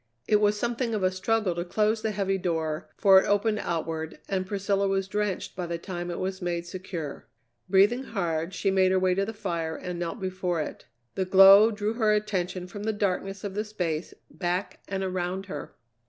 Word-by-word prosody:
It 210 Hz, -, +5 dB
was 210 Hz, 0 st, +3 dB
something 235 Hz, 0 st, -1 dB
of 205 Hz, -, -2 dB
a 185 Hz, -, +3 dB
struggle 195 Hz, +1 st, 0 dB
to 170 Hz, 0 st, -3 dB
close 215 Hz, +5 st, +1 dB
the 220 Hz, -, 0 dB
heavy 195 Hz, -2 st, -1 dB
door, 160 Hz, -2 st, -2 dB
for 195 Hz, -2 st, +7 dB
it -, -, -4 dB
opened 210 Hz, +1 st, +2 dB
outward, 160 Hz, -2 st, -3 dB
and 190 Hz, -1 st, -1 dB
Priscilla 200 Hz, 0 st, 0 dB
was 195 Hz, 0 st, 0 dB
drenched 205 Hz, -1 st, -2 dB
by 180 Hz, -1 st, -4 dB
the 170 Hz, 0 st, -2 dB
time 175 Hz, 0 st, -5 dB
it 175 Hz, -, -4 dB
was 190 Hz, +1 st, -3 dB
made 175 Hz, -1 st, -2 dB
secure. 175 Hz, -5 st, -6 dB, 0.4 s
Breathing 205 Hz, +7 st, +4 dB
hard, 170 Hz, -6 st, -2 dB
she 195 Hz, +1 st, +1 dB
made 190 Hz, -1 st, +3 dB
her 190 Hz, -, +3 dB
way 185 Hz, 0 st, +3 dB
to 195 Hz, +2 st, 0 dB
the 220 Hz, -, -4 dB
fire 165 Hz, -6 st, -3 dB
and 180 Hz, +1 st, -5 dB
knelt 175 Hz, +6 st, -3 dB
before 185 Hz, -2 st, -2 dB
it. 155 Hz, -, -5 dB, 0.3 s
The 190 Hz, -, -1 dB
glow 195 Hz, +3 st, +8 dB
drew 210 Hz, 0 st, -2 dB
her 220 Hz, -2 st, +2 dB
attention 190 Hz, -4 st, -1 dB
from 190 Hz, +3 st, -8 dB
the 220 Hz, +1 st, -1 dB
darkness 195 Hz, -1 st, -2 dB
of 200 Hz, -2 st, -4 dB
the 210 Hz, +2 st, -1 dB
space 175 Hz, -7 st, -3 dB, 0.2 s
back 180 Hz, +1 st, -2 dB
and 195 Hz, 0 st, -2 dB
around 185 Hz, +1 st, -2 dB
her. 150 Hz, -7 st, -7 dB
190 Hz, 200 wpm, -27 LUFS, 175-205 Hz, 0.4 s, glow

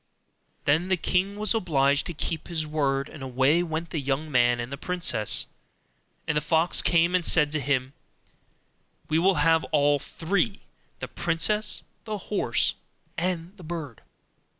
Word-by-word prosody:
Then 160 Hz, +5 st, +2 dB
the 185 Hz, -1 st, +1 dB
king 185 Hz, +4 st, 0 dB
was 210 Hz, +1 st, +2 dB
obliged 145 Hz, -9 st, +1 dB
to 175 Hz, -, -6 dB
keep 160 Hz, +1 st, -4 dB
his 160 Hz, -3 st, -3 dB
word, 140 Hz, -3 st, -1 dB
and 150 Hz, -, -12 dB
away 135 Hz, +5 st, +2 dB
went 165 Hz, -1 st, -4 dB
the 160 Hz, -, -2 dB
young 140 Hz, +3 st, -2 dB
man 120 Hz, -2 st, +3 dB
and 120 Hz, +2 st, -5 dB
the -, -, -3 dB
princess; 175 Hz, -, +2 dB, 0.8 s
and 160 Hz, -, 0 dB
the 150 Hz, -, +2 dB
fox 160 Hz, +3 st, +3 dB
came 170 Hz, +1 st, +2 dB
and 180 Hz, -1 st, +2 dB
said 150 Hz, -3 st, +3 dB
to 155 Hz, -, -1 dB
him, 130 Hz, -1 st, -1 dB, 1.2 s
'We 155 Hz, -, +2 dB
will 190 Hz, +2 st, +3 dB
have 160 Hz, +1 st, +3 dB
all 145 Hz, -1 st, +2 dB
three, 195 Hz, -, -2 dB, 0.4 s
the -, -, -4 dB
princess, 210 Hz, +6 st, 0 dB, 0.2 s
the 215 Hz, -1 st, -3 dB
horse, 205 Hz, +1 st, 0 dB, 0.4 s
and 175 Hz, +1 st, -3 dB
the 185 Hz, -, -13 dB
bird. 155 Hz, -7 st, -6 dB
160 Hz, 155 wpm, -26 LUFS, 145-180 Hz, 1.2 s, man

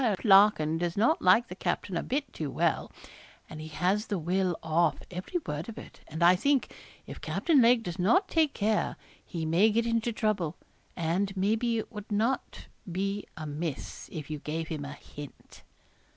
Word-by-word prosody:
Larkin 195 Hz, -7 st, +5 dB
does 175 Hz, +1 st, -2 dB
not 305 Hz, +11 st, +3 dB
like 215 Hz, +6 st, +5 dB
the -, -, -7 dB
captain 180 Hz, 0 st, -2 dB
a 165 Hz, -, 0 dB
bit 280 Hz, +2 st, -3 dB
too 155 Hz, -3 st, -4 dB
well -, -, 0 dB, 0.6 s
and 155 Hz, -1 st, -8 dB
he 155 Hz, -, -7 dB
has 185 Hz, +7 st, 0 dB
the 205 Hz, -, -1 dB
will 180 Hz, +1 st, 0 dB
off, 160 Hz, -1 st, +2 dB
every 185 Hz, -, -3 dB
word 150 Hz, +7 st, -4 dB
of 225 Hz, -, -8 dB
it; -, -, -11 dB
and 160 Hz, +2 st, -3 dB
I 175 Hz, +2 st, +7 dB
think, 275 Hz, +7 st, +1 dB, 0.3 s
if -, -, -9 dB
Captain 310 Hz, -6 st, +2 dB
Lake 235 Hz, 0 st, +5 dB
does 175 Hz, -4 st, -5 dB
not 360 Hz, -, +3 dB
take 315 Hz, -5 st, +2 dB
care, 215 Hz, +1 st, 0 dB, 0.3 s
he 165 Hz, -2 st, -5 dB
may 175 Hz, +7 st, +4 dB
get 225 Hz, +2 st, +1 dB
into 230 Hz, 0 st, 0 dB
trouble; 210 Hz, -8 st, -1 dB, 0.4 s
and 185 Hz, +4 st, -1 dB
maybe 225 Hz, +4 st, +1 dB
it 220 Hz, -, -4 dB
would 210 Hz, -1 st, -9 dB
not 225 Hz, +6 st, -1 dB, 0.3 s
be 195 Hz, +3 st, -2 dB
amiss 155 Hz, 0 st, -5 dB
if 155 Hz, -1 st, -6 dB
you 150 Hz, -, -3 dB
gave 160 Hz, +2 st, -4 dB
him 150 Hz, -3 st, -4 dB
a 140 Hz, -, -6 dB
hint.' 145 Hz, 0 st, -12 dB
190 Hz, 180 wpm, -29 LUFS, 160-220 Hz, 0.6 s, I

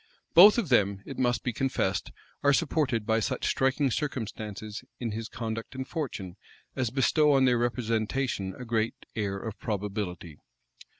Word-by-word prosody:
Both 200 Hz, +7 st, +9 dB
of 215 Hz, -10 st, 0 dB
them, 100 Hz, -5 st, +2 dB
it 135 Hz, -, -7 dB
must 120 Hz, -1 st, +1 dB
be 120 Hz, -, -1 dB
confessed, 110 Hz, -7 st, -1 dB, 0.3 s
are 140 Hz, 0 st, +4 dB
supported 140 Hz, -7 st, +1 dB
by 110 Hz, 0 st, +2 dB
such 125 Hz, +3 st, -2 dB
striking 135 Hz, +1 st, +2 dB
circumstances 110 Hz, -6 st, -4 dB, 0.2 s
in 120 Hz, -3 st, -2 dB
his 110 Hz, +1 st, -4 dB
conduct 115 Hz, +2 st, -5 dB
and 130 Hz, 0 st, -4 dB
fortune, 105 Hz, -, -5 dB, 0.4 s
as 130 Hz, -3 st, 0 dB
bestow 145 Hz, +4 st, +3 dB
on 135 Hz, -1 st, +5 dB
their 125 Hz, -2 st, +3 dB
representation 115 Hz, -3 st, -1 dB
a 125 Hz, -, -7 dB
great 115 Hz, -1 st, 0 dB, 0.2 s
air 100 Hz, -3 st, -1 dB
of 110 Hz, +1 st, -6 dB
probability. 100 Hz, -6 st, -4 dB
115 Hz, 155 wpm, -28 LUFS, 105-135 Hz, 0.4 s, Both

